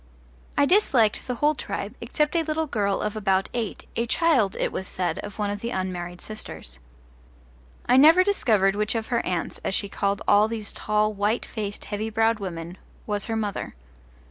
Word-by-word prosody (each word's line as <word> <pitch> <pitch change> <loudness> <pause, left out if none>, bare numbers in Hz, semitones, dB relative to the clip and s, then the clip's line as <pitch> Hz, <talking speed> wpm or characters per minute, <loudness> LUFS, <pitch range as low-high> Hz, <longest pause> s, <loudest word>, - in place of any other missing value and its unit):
I 285 - +5
disliked 275 - +3
the 250 - -1
whole 295 +5 +3
tribe, 205 -5 -5
except 295 +7 0
a 335 - +4
little 320 0 -1
girl 205 -8 0
of 210 +1 -2
about 195 -2 +1
eight, 230 -4 -4
a 235 +1 0
child, 260 - +2
it - - 0
was 190 - -4
said, 180 -1 -2
of 205 -1 -7
one 205 -1 -1
of 205 - -4
the 235 - -4
unmarried 180 -4 -4
sisters. 65 - -7 1.1
I 250 - +4
never 320 +7 +8
discovered 215 - +2
which 210 +2 -1
of 225 -1 -2
her 235 -2 +1
aunts, 175 -2 -2
as 190 - 0
she 200 - -1
called 200 0 -1
all 205 +1 +5
these 220 -2 -5
tall, 215 0 +1
white 210 +3 0
faced 205 -3 -5
heavy 215 +1 -3
browed 225 0 +2
women, 175 -2 -6 0.3
was 205 -2 -1
her 225 - -2
mother. 210 - -3
210 Hz, 185 wpm, -25 LUFS, 200-235 Hz, 1.1 s, never